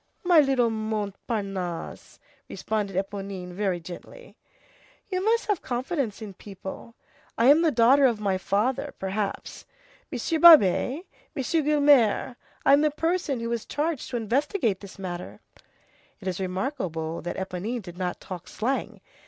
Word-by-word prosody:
"My 350 -3 +6
little 265 -5 +3
Montparnasse," 200 -4 -4 0.3
responded 205 -3 -3
Éponine 195 -1 -4
very 185 -1 -1
gently, 180 - -11 0.7
"you 370 -1 -1
must 455 +2 +2
have 410 -5 0
confidence 250 - -3
in 205 -2 -8
people. 195 +4 -9 0.4
I 230 - +3
am 305 +3 +5
the 335 - +4
daughter 265 +2 +5
of 230 -4 -1
my 195 -3 0
father, 255 +10 -1
perhaps. 195 +1 -4 0.4
Monsieur 325 -2 -1
Babet, 310 - +7 0.3
Monsieur 315 +4 0
Guelemer, 285 -6 +3 0.3
I'm 280 +1 +6
the 305 - +3
person 310 -4 -1
who 230 - -3
was 235 -2 -2
charged 305 -2 -2
to 245 - -2
investigate 235 - 0
this 200 -1 -12
matter." 180 -2 -6 0.8
It 190 - -8
is 185 -1 -2
remarkable 185 - -3
that 175 - -4
Éponine 190 +5 -4
did 175 0 -10
not 180 -1 -2
talk 180 -2 -8
slang. 260 +5 -3
225 Hz, 135 wpm, -26 LUFS, 190-285 Hz, 0.8 s, Babet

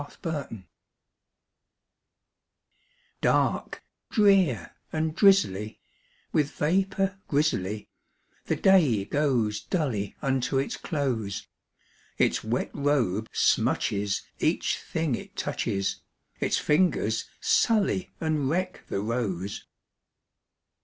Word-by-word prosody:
A 145 - -11
WET 155 -5 -3
DAY 105 -4 -9 2.6
Dark, - - +1 0.3
drear, 190 - +3 0.2
and 160 0 -1
drizzly, 175 - +3 0.5
with 150 -2 +2
vapor 195 +4 0
grizzly, 110 -9 0 0.6
The - - 0
day 150 - +4
goes 125 -8 +1
dully 130 - -2
unto 135 0 0
its 135 - -1
close; 125 - -2 0.7
Its - - +2
wet 115 +3 -1
robe 120 -8 +1
smutches 100 -1 +1 0.2
each - - +1
thing 160 -4 -2
it - - -6
touches, 100 0 -2 0.4
Its - - +1
fingers 150 - +1
sully 210 -5 +2
and 155 -4 0
wreck 185 +3 -2
the 100 - -2
rose. 100 -4 -3
140 Hz, 90 wpm, -27 LUFS, 110-165 Hz, 2.6 s, day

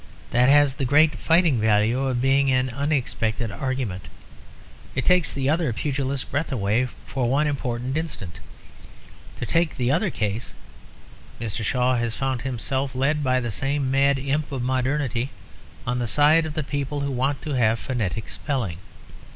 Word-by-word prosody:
That 125 +2 +4
has 145 -1 +5
the 135 - -4
great 150 +4 +4
fighting 160 -1 +3
value 110 +3 +3
of 125 -2 -1
being 135 +1 +3
an 130 0 +2
unexpected 120 -5 -1
argument; 130 - -3 0.9
it 130 - -1
takes 180 -6 +4
the 135 -1 -2
other 155 -2 +2
pugilist's 135 +1 -2
breath 150 +3 -2
away 115 +1 +1 0.2
for 125 -3 -1
one 140 +4 +2
important 130 -3 -2
instant. 120 - -4 1.0
To - - -4
take 165 +6 +1
the 125 0 +1
other 180 +7 +2
case, 110 - -3 0.8
Mr. 110 0 -3
Shaw 125 +3 +1
has 120 -1 -1
found 130 -2 -2
himself, 130 +1 -2
led 145 +3 +1
by 130 -1 +2
the 120 -3 -3
same 135 +5 -1
mad 140 0 +3
imp 140 +3 -2
of 130 -3 -3
modernity, 130 -1 0 0.6
on 125 +1 -1
the 120 - -1
side 155 +6 +4
of 155 - -7
the 155 - -1
people 145 +1 -3
who 140 0 -2
want 135 +2 0
to 155 - -4
have 115 -3 +3
phonetic 110 -4 -3
spelling. 120 - -3
130 Hz, 160 wpm, -24 LUFS, 120-145 Hz, 1.0 s, has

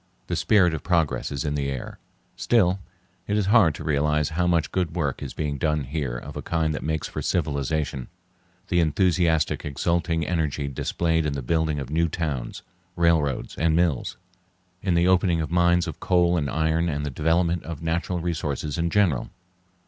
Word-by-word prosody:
The - - -2
spirit 95 -6 +3
of 80 - -3
progress 85 -2 0
is 70 -1 -3
in 75 - -1
the 70 -1 -1
air. 65 -2 -6 0.4
Still 95 -5 +2 0.5
it 105 - +1
is 105 - +1
hard 95 -10 +5
to - - -7
realize 75 0 +1
how 90 +2 0
much 85 -3 +1
good 90 -3 -1
work 75 -7 -1
is - - -6
being 75 -2 -2
done 75 -1 0
here 65 -3 -3
of - - -9
a - - -4
kind 80 -2 0
that - - -4
makes 80 -1 -2
for - - -5
civilization—the 85 +4 -3
enthusiastic, 85 -1 +2
exulting 85 +2 0
energy 75 -4 -1
displayed 80 +4 0
in 75 - -1
the 70 -2 -4
building 80 +3 0
of 70 -1 -5
new 85 +2 +2
towns, 75 -7 -4 0.3
railroads, 80 -5 +1
and 80 -1 +2
mills, 85 -6 0 0.6
in 95 -3 +1
the 85 +1 +3
opening 90 -2 +3
of 80 -1 -3
mines 85 0 +3
of - - -6
coal 90 -1 +3
and 75 -5 0
iron 80 +2 +1
and 75 -1 -2
the 70 - -3
development 85 +4 +1
of 80 -1 -7
natural 85 +2 -1
resources 75 -3 -3
in 85 0 +1
general. 85 -11 +1
80 Hz, 180 wpm, -25 LUFS, 75-85 Hz, 0.6 s, hard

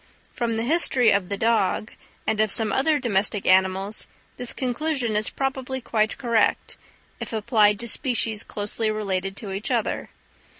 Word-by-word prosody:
From 235 -1 -1
the 225 - -1
history 265 -3 +3
of 200 -3 +1
the 200 - -2
dog, 220 -2 +1 0.3
and 215 - 0
of 215 -2 +2
some 220 0 +1
other 300 +3 +2
domestic 205 -5 0
animals, 190 +2 +2 0.3
this 245 -1 0
conclusion 255 -2 -1
is 215 +1 +1
probably 265 -1 -3
quite 220 -3 0
correct, 235 -4 +1 0.4
if - - -6
applied 210 -2 +3
to 235 - -3
species 230 -3 0
closely 210 +1 -2
related 195 -2 -2
to 205 -4 -5
each 195 +2 -4
other. - - -1
220 Hz, 155 wpm, -24 LUFS, 205-245 Hz, 0.4 s, history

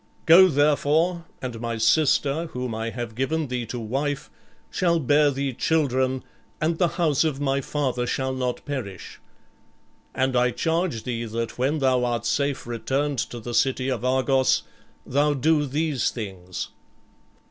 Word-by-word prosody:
Go, 180 +3 +8
therefore, 150 +3 +2 0.2
and 120 -3 -5
my 115 -1 -3
sister, 145 +6 +2
whom 125 -2 -3
I 110 +1 -3
have 120 -1 -5
given 140 +5 -1
thee 125 -2 -3
to 120 - -5
wife, 140 +6 -3 0.4
shall 170 -2 +2
bear 145 +1 +4
thee 140 -1 -2
children, 130 -3 +1 0.4
and 160 +1 0
the 175 - +4
house 160 -5 +2
of 150 -4 -1
my 140 -1 0
father 130 -3 -1
shall 130 +1 -1
not 125 -1 -3
perish. 125 -10 -6 1.0
And 130 0 +1
I 125 0 +4
charge 165 -3 -1
thee 120 -2 -3
that 115 +1 -4
when 140 +5 +1
thou 130 -3 +2
art 120 -2 -1
safe 140 +4 0
returned 135 +4 -1
to 120 - -3
the 120 +1 -6
city 130 +1 +1
of 125 -3 -2
Argos, 130 +1 +2 0.4
thou 145 +2 +2
do 150 +2 +2
these 145 -2 0
things. 95 -5 -6
130 Hz, 150 wpm, -24 LUFS, 120-150 Hz, 1.0 s, Go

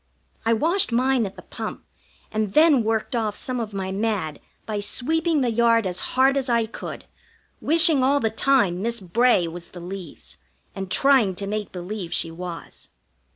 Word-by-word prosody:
I 230 - +4
washed 330 - +1
mine 250 -1 +2
at 190 - -11
the - - -12
pump, - - -7 0.5
and 215 -2 -2
then 305 -6 +5
worked 220 +3 -1
off 215 -3 -1
some 255 -1 -4
of 220 -2 -4
my 190 -1 -4
mad 195 -6 -2 0.3
by 215 -2 -3
sweeping 320 +8 +1
the 245 -2 +1
yard 230 -1 +3
as 180 -1 -2 0.2
hard 270 +1 +5
as 265 -1 -1
I 235 -1 +2
could, 220 - -8 0.6
wishing 320 -3 +4
all 280 +2 +3
the 225 -4 0
time 220 -7 +2
Miss 235 +2 -1
Bray 195 0 +2
was 170 +1 -8
the 180 - -11
leaves, 180 -2 -8 0.4
and 195 -1 -6
trying 255 -6 +4
to 200 - -5
make 210 +1 -3
believe 180 0 -5
she 165 - -1
was. 175 0 -9
220 Hz, 175 wpm, -23 LUFS, 190-260 Hz, 0.6 s, then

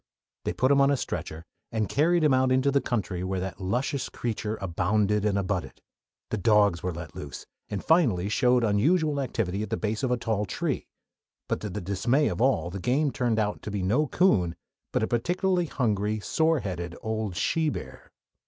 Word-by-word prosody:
They - - 0
put 130 +2 +2
him 140 0 +5
on 140 - +5
a 140 - +2
stretcher 80 -8 -5 0.3
and 110 -2 0
carried 165 - +2
him 150 -3 +4
out 130 0 +3
into 130 +2 +3
the 140 0 +2
country 95 -6 -2
where 95 0 -2
that 95 +1 -5
luscious 130 +8 -1
creature 110 -2 -3
"abounded 100 +3 +1
and 100 -2 +2
abutted." 100 -1 -2 0.5
The 110 - -1
dogs 105 -3 +4
were 90 - -2
let 85 -2 -8
loose, 70 - -7 0.2
and 100 -2 -4
finally 120 - +3
showed 125 +3 +3
unusual 145 - +2
activity 105 -7 -2
at 110 - -4
the 110 - -1
base 110 0 -2
of 130 - 0
a 125 - +1
tall 110 -3 -1
tree; 90 - -2 0.6
but, - - -1
to 105 - -5
the 105 +2 -4
dismay 100 - +1
of - - -3
all, 90 -10 +2
the 100 - -5
game 135 - +1
turned 120 -4 0
out 105 -1 -1
to - - -6
be 100 -2 -2
no 125 +11 +2
coon, 95 - +2 0.4
but - - 0
a - - +1
particularly 175 +8 +1
hungry, 110 -5 0
sore 160 +6 +1
headed, 85 -3 -4
old 110 -4 -2
she 160 - +1
bear. 65 - -8
110 Hz, 195 wpm, -27 LUFS, 95-135 Hz, 0.6 s, him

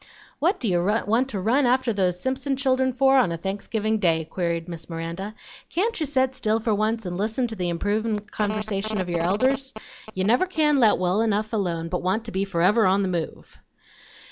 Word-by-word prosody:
"What 345 +7 +1
do 240 - -2
you 175 -3 +1
want 225 +5 +1
to 205 - -3
run 245 +7 +2
after 255 -1 +2
those 180 -3 0
Simpson 265 +4 -1
children 260 -1 +1
for 270 +1 +4
on 215 -9 +2
a 165 - -3
Thanksgiving 205 +4 -2
Day?" 165 -4 +2
queried 170 0 -2
Miss 165 -2 -8
Miranda. 170 +5 -5 0.3
"Can't 430 +6 -1
you 310 - -1
set 260 -2 +1
still 225 -4 0
for 225 -1 0
once 215 +1 0
and 175 -1 -4
listen 220 +5 0
to 225 -2 -4
the 180 -3 -2
improvin' 210 +5 -1
conversation 215 0 -2
of 185 -1 -2
your 170 -1 0
elders? 260 +9 +1 0.4
You 185 - 0
never 245 - +3
can 305 -5 +2
let 225 -4 +5
well 185 +3 +1
enough 215 0 0
alone, 170 -6 -1
but 180 +1 -2
want 195 +5 -1
to 225 - -6
be 195 0 -1
forever 195 +3 +3
on 195 +2 +3
the 190 - -1
move." 170 -3 -5
215 Hz, 200 wpm, -24 LUFS, 185-255 Hz, 0.4 s, let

